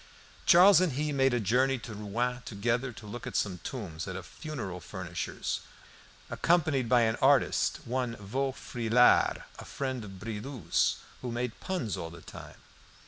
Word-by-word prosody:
Charles 185 +2 +8
and 180 -6 +1
he 150 +3 -1
made 135 -1 +3
a 120 - +1
journey 130 +6 +2
to 115 -2 -8
Rouen 120 +4 -2
together 120 +4 -1
to 115 -1 -12
look 110 +3 -7
at - - -6
some 95 -4 0
tombs 90 -10 -6
at 95 - -5
a 95 - -5
funeral 105 - -6
furnisher's, 85 - -4 0.7
accompanied 155 -8 +1
by 125 -1 +5
an 110 -1 +2
artist, 135 0 +3
one 125 -1 -2
Vaufrylard, 125 +1 +2 0.2
a - - -7
friend 130 -4 -4
of 95 -2 -9
Bridoux's, 115 +5 -1 0.3
who 125 - -4
made 120 0 -3
puns 135 - -3
all 80 - -5
the 85 0 -12
time. - - -11
120 Hz, 155 wpm, -30 LUFS, 105-135 Hz, 0.7 s, Charles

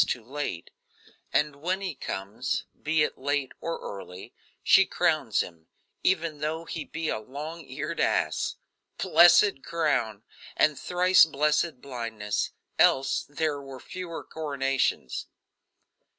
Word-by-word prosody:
too 120 - -2
late 130 - -5 0.6
and 150 -1 +1
when 180 +6 -1
he 190 -4 -3
comes, 110 -1 -3 0.2
be 155 0 +2
it - - -2
late 140 0 -1
or 165 0 -2
early, 95 -2 -8 0.3
she 195 - +7
crowns 155 - +1
him, 85 -2 -9 0.3
even 165 -5 +1
though 160 +3 -2
he 165 - -4
be 165 0 -4
a 110 - -1
long 150 +9 -7
eared - - -4
ass. - - +1 0.4
Blessed 175 -3 +6
crown! 130 -11 0 0.3
and 150 -2 +3
thrice 180 +1 +5
blessed 150 -1 +1
blindness 115 -6 -3 0.3
else 135 0 +3
there 145 -1 -1
were 135 -1 -9
fewer 175 +3 -7
coronations. 135 - -1
145 Hz, 120 wpm, -27 LUFS, 125-165 Hz, 0.6 s, she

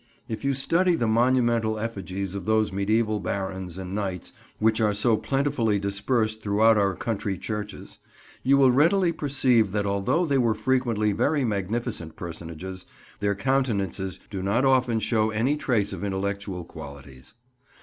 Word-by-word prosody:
If 110 - -5
you 140 0 +1
study 170 +6 +2
the 120 - 0
monumental 120 -1 +2
effigies 100 -4 -4
of 100 -3 -6
those 110 -1 +2
mediæval 105 +2 0
barons 95 -1 -4
and 95 0 -6
knights 95 -4 -3 0.2
which 110 +1 +2
are 105 -2 +2
so 110 +2 +3
plentifully 115 -1 0
dispersed 110 +3 -1
throughout 110 +2 +4
our 100 -2 +2
country 100 -4 -3
churches, 105 +1 -6 0.4
you 140 +2 +4
will 135 -2 +6
readily 170 +7 +3
perceive 130 - +2
that 105 -1 0
although 100 - +1
they 140 -4 +2
were 115 -3 +2
frequently 120 -4 +1
very 145 +8 +1
magnificent 105 -3 -3
personages, 85 +2 -7 0.3
their 100 0 0
countenances 100 -6 -1
do 95 -2 -4
not 105 +8 +1
often 130 -3 +3
show 110 0 +1
any 115 +7 +1
trace 115 -8 0
of - - -6
intellectual 100 -2 -3
qualities. 70 - -11
110 Hz, 150 wpm, -25 LUFS, 100-125 Hz, 0.4 s, will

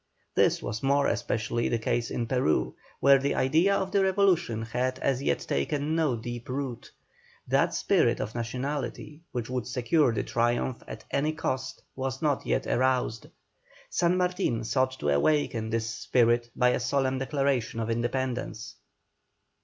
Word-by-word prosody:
This - - +2
was 110 +2 -4
more 140 +1 +2
especially 115 -1 -1
the 120 - +1
case 115 +1 -1
in 120 - -2
Peru, 125 -8 +1 0.3
where 140 0 +6
the 140 +1 0
idea 165 +9 +3
of 190 -1 -1
the 200 0 +3
revolution 185 - +2
had 125 +3 -1
as 135 -1 0
yet - - 0
taken 145 - -1
no 155 -6 +2
deep 120 +1 -7
root; 130 -2 -4 0.6
that - - +2
spirit - - +2
of 110 - -4
nationality 130 +4 -4
which 120 -3 -3
would 125 -3 -3
secure 125 +3 +2
the 115 - -1
triumph 120 +1 0
at - - -9
any 150 +3 +1
cost 130 -3 -3
was 130 0 -3
not 145 -4 0
yet - - 0
aroused. 125 -3 0 0.6
San 175 +1 +2
Martin 180 -11 0
sought 130 +4 0
to 75 - -1
awaken 115 - +1
this 115 0 -1
spirit 120 +1 +1
by 125 -1 +4
a 125 - +1
solemn 130 +1 0
declaration 135 -4 0
of 115 0 -1
independence. 120 +2 -3
130 Hz, 155 wpm, -28 LUFS, 115-140 Hz, 0.6 s, where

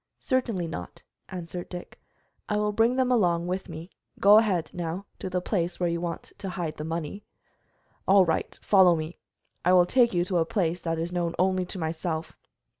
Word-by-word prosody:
"Certainly 235 - 0
not," 90 - -7 0.3
answered 175 -1 -6
Dick; 175 -1 -9 0.5
"I 210 - +1
will 210 0 +1
bring 225 +4 +3
them 255 -1 +2
along 175 -8 +2
with 185 +2 -3
me. 165 +2 -8 0.3
Go 205 +2 +8
ahead, 190 -7 0
now, 175 +3 -4
to - - -4
the 180 0 -1
place 175 -2 -1
where 175 -1 +1
you 170 0 -2
want 170 -1 -5
to 195 - -4
hide 175 -4 -4
the 150 - -4
money." 165 +4 -4 0.8
"All 195 -1 +6
right, 160 -1 -1
follow 190 -4 +6
me. 160 +1 -5 0.4
I 180 - +4
will 180 -1 +7
take 240 +5 +4
you 175 0 +2
to 180 -2 +1
a - - +4
place 175 -1 -1
that 165 -1 -2
is 165 +2 -3
known 175 -1 -1
only 185 0 +2
to 190 - -4
myself." 160 0 -3
180 Hz, 190 wpm, -27 LUFS, 170-195 Hz, 0.8 s, Go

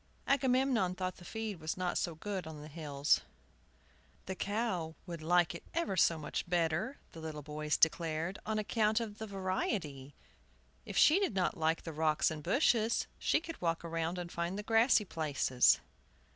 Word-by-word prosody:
Agamemnon 260 -8 +2
thought 185 0 -3
the 180 - -13
feed 220 -1 -5
was 155 +2 -3
not 180 -1 -1
so 170 - -1
good 190 0 -4
on 155 -1 -8
the 150 - -9
hills. 145 -2 +1 1.0
"The 190 - -3
cow 190 -5 -2
would 170 -3 -6
like 175 +1 +3
it 170 - -8
ever 335 - 0
so 170 -2 +4
much 155 +2 -4
better," 175 - 0
the 165 - -10
little 155 -2 -6
boys 150 +1 -1
declared, 165 +2 +1
"on 220 0 -2
account 215 +1 +1
of 220 -2 -6
the 220 - -5
variety. 185 - -3 0.7
If - - -4
she 320 +6 +7
did 390 - 0
not 190 +2 +1
like 160 -1 0
the 165 - -6
rocks 155 0 +2
and 155 -1 -6
the 170 - -6
bushes, 230 -2 +3
she - - +2
could 330 0 -8
walk 165 -1 0
round 165 +1 -2
and 175 -1 -5
find 170 +3 -2
the 210 - -4
grassy 225 0 +4
places." 140 -7 +3
175 Hz, 175 wpm, -33 LUFS, 160-210 Hz, 1.0 s, she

